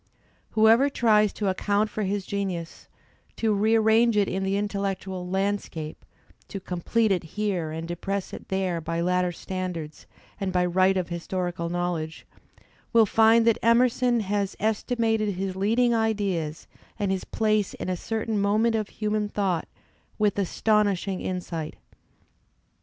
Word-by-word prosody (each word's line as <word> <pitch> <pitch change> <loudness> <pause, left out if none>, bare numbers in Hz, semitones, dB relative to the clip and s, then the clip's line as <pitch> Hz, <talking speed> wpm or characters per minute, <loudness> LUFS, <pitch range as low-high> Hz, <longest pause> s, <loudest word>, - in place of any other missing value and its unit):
Whoever 225 +6 +6
tries 215 -5 +3
to 205 - -2
account 205 +3 +1
for 215 - -3
his 200 -1 -1
genius, 185 -5 -4 0.5
to 220 -2 +1
rearrange 220 +2 +3
it 200 -2 +3
in 190 - -2
the 195 +1 0
intellectual 195 -3 -3
landscape, 190 -5 -2 0.4
to 200 - -6
complete 195 +5 0
it 185 -3 +1
h«« - - -4
and 165 -6 -2
depress 195 +3 -4
it - - -8
there 185 -3 -1
by 165 +1 -3
later 180 +1 +1
standards 175 -4 -6 0.3
and 195 -2 -1
by 180 -1 +2
right 185 +2 +3
of 180 -2 -2
historical 175 0 -3
knowledge, 175 -2 -3 0.7
will 230 -1 +6
find 225 +2 +5
that 230 -2 +3
Emerson 240 +1 +3
has 200 -1 -1
estimated 220 -1 0
his 190 0 -3
leading 230 +5 +2
ideas 200 -9 -1 0.3
and 205 -3 0
his 190 -1 -1
place 215 -2 0
in - - -6
a 185 - 0
certain 220 +2 -2
moment 215 +3 +2
of 215 -2 -1
human 210 -1 -2
thought 190 -5 -1 0.5
with 210 -1 +1
astonishing 200 -1 +1
insight. 170 -4 -4
200 Hz, 140 wpm, -26 LUFS, 180-215 Hz, 0.7 s, Whoever